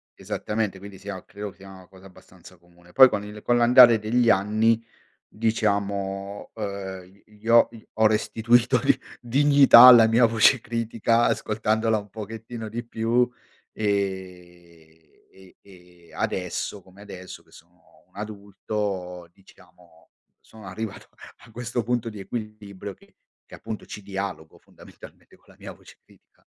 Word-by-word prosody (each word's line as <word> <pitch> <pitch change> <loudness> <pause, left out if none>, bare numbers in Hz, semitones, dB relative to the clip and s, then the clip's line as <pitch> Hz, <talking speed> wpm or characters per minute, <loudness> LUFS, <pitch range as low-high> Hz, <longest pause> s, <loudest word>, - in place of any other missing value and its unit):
Esattamente 105 -3 -4
quindi 100 0 -11
sia, 95 -1 -8
credo, 105 0 -8
sia 95 0 -15
una 95 -1 -14
cosa 95 0 -18
abbastanza 90 -1 -17
comune. 85 +1 -23
Poi 130 -1 +8
con 100 - -3
il 105 +1 -10
con 120 +2 +1
l'andare 120 -1 +7
degli 115 +2 +1
anni, 110 +3 +2 0.4
diciamo, 100 -3 -3
uhm, 100 -2 -7
gli 105 +1 -16
ho 115 0 +5 0.2
ho 110 0 +3
restituito 115 +2 +1
di - - +2 0.2
dignità 140 0 +6
alla 120 -3 +9
mia 115 +2 +4
voce 115 +3 +4
critica 115 0 -1
ascoltandola 110 +1 0
un 105 -1 -8
pochettino 110 +2 -8
di 120 +2 -6
più 120 +2 0 0.4
e 90 -5 -5 0.3
e 95 -1 -19
e 90 -3 -20
adesso 95 +2 -4
come 95 +2 -19
adesso 95 -3 -11
che - - -29
sono - - -22
un 90 - -35
adulto 100 -3 -6
diciamo, 85 -3 -23 0.3
sono 110 -2 -16
arrivato 100 +3 -7
a - - -17
a - - -18
questo 120 +1 -4
punto 120 -1 -2
di 105 -2 -10
equilibrio 105 -2 -8
che - - -25 0.3
che - - -10
appunto 110 - -8
ci 105 - -9
dialogo 95 -5 -6
fondamentalmente - - -17
con - - -30
la - - -19
mia - - -10
voce - - -18
critica. - - -27
105 Hz, 140 wpm, -24 LUFS, 95-115 Hz, 0.4 s, alla